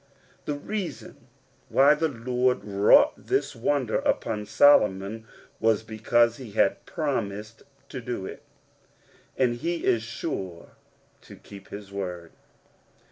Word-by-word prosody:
The 145 - -2
reason 190 +6 -6 0.4
why 140 +2 +6
the 160 +2 0
Lord 125 -1 0
wrought 100 0 +5
this - - -2
wonder 125 0 0
upon 105 -1 -1
Solomon 105 -4 +3 0.3
was 110 -1 +2
because 115 +1 +2
he 120 -6 -10
had 100 - +1
promised 110 - -3 0.3
to 130 - -6
do 120 -5 -4
it, - - -8 1.0
and 120 -2 +2
he 170 +6 -3
is 115 - +3
sure 95 -6 -5 0.5
to - - -13
keep 100 -1 -13
his 100 -1 -9
word. 90 -4 -5
115 Hz, 120 wpm, -26 LUFS, 100-130 Hz, 1.0 s, why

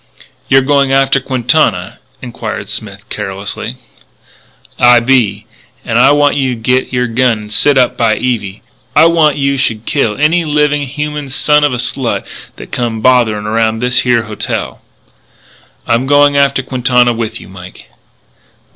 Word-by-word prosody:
"You're 135 0 +4
going 140 -1 +1
after 135 0 +2
Quintana?" 125 - 0 0.2
inquired 110 -4 -6
Smith, 100 -2 -7
carelessly. 100 +4 -5 1.0
"I 120 0 +6
be. 115 -5 +1 0.4
And - - 0
I - - +5
want 145 0 +2
you 135 -3 0
should 115 -2 -10
git 125 +2 0
your 125 -1 0
gun 120 0 +1
and 105 0 -9
set 145 +5 +3
up 125 -1 +2
by 115 -2 +2
Evie. 105 -5 -3 0.3
And 155 - +6
I - - +6
want 160 -3 +3
you 140 0 0
should 115 -4 -1
kill 115 -7 -1
any 160 +4 +2
living 150 -2 0
human 150 +1 -5
son 150 +2 +2
of 145 - +2
a 125 - -2
slut 125 0 -2 0.3
that - - -12
comes 115 -3 -3
botherin' 115 -5 +2
around 110 +1 0
this 125 +1 +1
here 120 -2 +1
hotel." 105 -2 -5 1.0
"I'm 120 +3 0
going 145 0 +4
after 140 -1 +2
Quintana 125 -1 +1
with 115 0 -4
you, - - -13
Mike." 90 -1 -13
125 Hz, 155 wpm, -13 LUFS, 110-140 Hz, 1.0 s, I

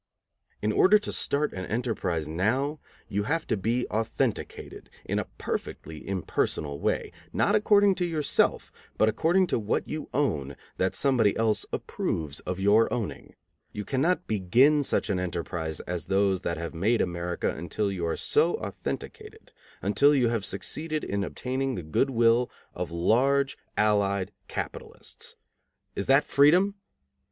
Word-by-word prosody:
In 105 - +2
order 195 - +6
to 210 - -4
start 150 +1 0
an 95 0 -5
enterprise 100 -9 -1
now, 125 - 0 0.3
you 100 +1 -1
have 165 +4 0
to 115 - 0
be 115 +5 0
authenticated, 110 +1 -3 0.2
in - - -1
a - - -4
perfectly 80 -1 -5
impersonal 75 -6 -1
way, - - -1 0.2
not 205 - +2
according 205 -1 +5
to - - +3
yourself, 155 -4 +1 0.3
but 110 - +4
according 165 - +3
to 175 - 0
what 105 0 -1
you 155 0 -5
own 75 - -1 0.2
that 95 0 0
somebody 120 -7 +3
else 110 -1 +1
approves 75 -3 -3
of 90 +1 -4
your 105 +3 +4
owning. 115 -4 -4 0.4
You 105 - -5
cannot 165 +7 +1
begin 120 +9 +3
such 110 - +1
an 95 - 0
enterprise 85 -3 -3
as 85 -2 -4
those 95 0 +2
that 85 - -2
have 85 0 -5
made 105 +8 +1
America 85 0 -1
until 100 +5 -2
you 90 -3 -4
are 80 - -1
so - - +2
authenticated, - - -7 0.3
until 140 +9 +4
you 125 -4 +3
have 115 -4 -1
succeeded 155 - -3
in 100 0 -1
obtaining 130 +5 -2
the 90 - -5
good 80 - +1
will 120 0 +3 0.2
of - - -4
large 130 +11 +2 0.2
allied 100 -2 +2 0.2
capitalists. - - -7 0.6
Is 100 - -3
that 135 +2 +5
freedom? 175 +8 +4
110 Hz, 145 wpm, -27 LUFS, 95-140 Hz, 0.6 s, order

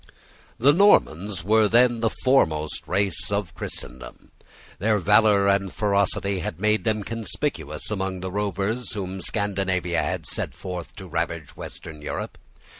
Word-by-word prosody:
The 140 +5 +5
Normans 105 - +3
were 110 +2 +4
then 120 +2 +4
the 115 0 +2
foremost 80 - +1
race 95 0 0
of 100 -4 -2
Christendom. - - -8 0.5
Their 105 +2 +2
valour 105 +1 +4
and 100 -1 +2
ferocity 100 -1 +1
had 90 -2 -5
made 105 +2 +1
them 110 -2 0
conspicuous 110 - -3
among 95 -2 -2
the 95 0 -4
rovers 105 +5 -2
whom 95 -2 -5
Scandinavia 95 -4 0
had - - -3
sent - - -4
forth 90 -3 -6
to - - -9
ravage - - -3
Western 80 -3 -9
Europe. 75 - -5
100 Hz, 135 wpm, -24 LUFS, 90-110 Hz, 0.5 s, The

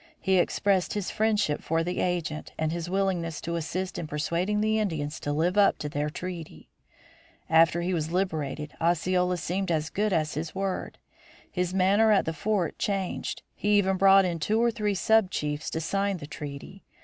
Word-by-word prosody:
He 190 -2 +2
expressed 190 +1 +1
his 205 -3 -2
friendship 210 -8 +1
for 165 +1 0
the 180 +2 -3
agent 170 -4 -2
and 155 0 0
his 170 0 -4
willingness 180 -4 -1
to 170 0 -3
assist 180 +3 -3
in 160 - -4
persuading 170 +7 -1
the 215 +1 +2
Indians 155 -8 -2
to 145 - -3
live 170 +7 +1
up 200 - +5
to 150 - -4
their 145 +1 -2
treaty. 175 0 -7 0.8
After 165 +1 +5
he 185 +1 -1
was 160 -2 -1
liberated 155 -5 -2
Osceola 180 +2 +1
seemed 190 +2 -2
as 155 -2 0
good 210 +1 0
as 155 -4 0
his 155 +3 -4
word. 195 -1 -3 0.5
His 180 -1 -1
manner 195 +4 +4
at 200 - +4
the 160 - -2
Fort 190 0 -1
changed. 195 -3 -2
He 205 0 +2
even 190 -1 +2
brought 195 0 +6
in 170 -2 -2
two 215 +8 +1
or 235 0 +3
three 210 -2 -1
sub 220 0 +3
chiefs 150 -2 -3
to 160 - -3
sign 195 +4 -1
the 145 - -8
treaty. 145 +6 -8
180 Hz, 185 wpm, -27 LUFS, 160-195 Hz, 0.8 s, brought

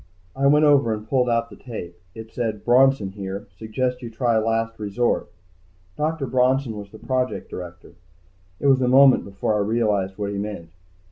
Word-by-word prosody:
I 135 +1 +2
went 150 +2 +5
over 135 -7 +4
and 105 0 -10
pulled 125 0 +1
out 115 0 0
the - - -10
tape. 100 -9 -8 0.2
It 110 0 -10
said: 110 -4 -3
BRONSON 125 -5 +4
HERE. 100 0 -6
SUGGEST 125 +3 -2
YOU 120 - -6
TRY 115 0 +1
LAST 115 0 -1
RESORT. 110 +3 -1 0.7
Dr. 155 -1 -1
Bronson 130 -1 +1
was 100 -1 -8
the 110 - -13
project 130 +2 -2
director. 90 -1 -9 0.7
It - - -5
was 135 -2 +4
a 125 - +2
moment 135 +1 +6
before 100 +2 -2
I 105 - +1
realized 105 -3 0
what 100 -1 -3
he 100 - -3
meant. 100 -5 -6
115 Hz, 180 wpm, -23 LUFS, 105-130 Hz, 0.7 s, moment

